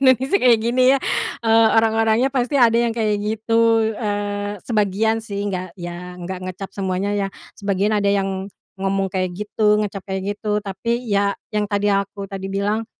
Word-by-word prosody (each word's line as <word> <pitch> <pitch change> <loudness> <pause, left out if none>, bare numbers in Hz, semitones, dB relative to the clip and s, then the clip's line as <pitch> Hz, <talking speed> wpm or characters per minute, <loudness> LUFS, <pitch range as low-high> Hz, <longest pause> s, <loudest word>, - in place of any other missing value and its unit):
Indonesia 265 - +4
kayak 240 - +5
gini 240 +3 +2
ya, - - +2 0.4
eee, 225 0 +5
orang-orangnya 225 +3 +3
pasti 255 0 -1
ada 235 -4 +5
yang 235 -1 +1
kayak 215 -3 0
gitu, 225 +1 +2
eee, 205 -2 -3
sebagian 220 0 +1
sih, 205 -2 -5
enggak 185 -3 -4
ya 175 0 -7
enggak 180 +1 -6
ngecap 185 +1 -6
semuanya 190 0 -2
ya, 200 - 0 0.3
sebagian 200 0 0
ada 205 -1 +1
yang 195 -1 0 0.3
ngomong 195 0 0
kayak 185 -2 -1
gitu, 210 +1 +2
ngecap 195 -2 -4
kayak 190 0 -3 0.2
gitu. 210 -1 0
Tapi 235 +5 -3
ya 200 0 +2 0.2
yang 210 0 0
tadi, 205 0 +1
aku 200 0 -2
tadi 195 -1 -5
bilang, 205 +3 -1
205 Hz, 165 wpm, -21 LUFS, 195-225 Hz, 0.4 s, kayak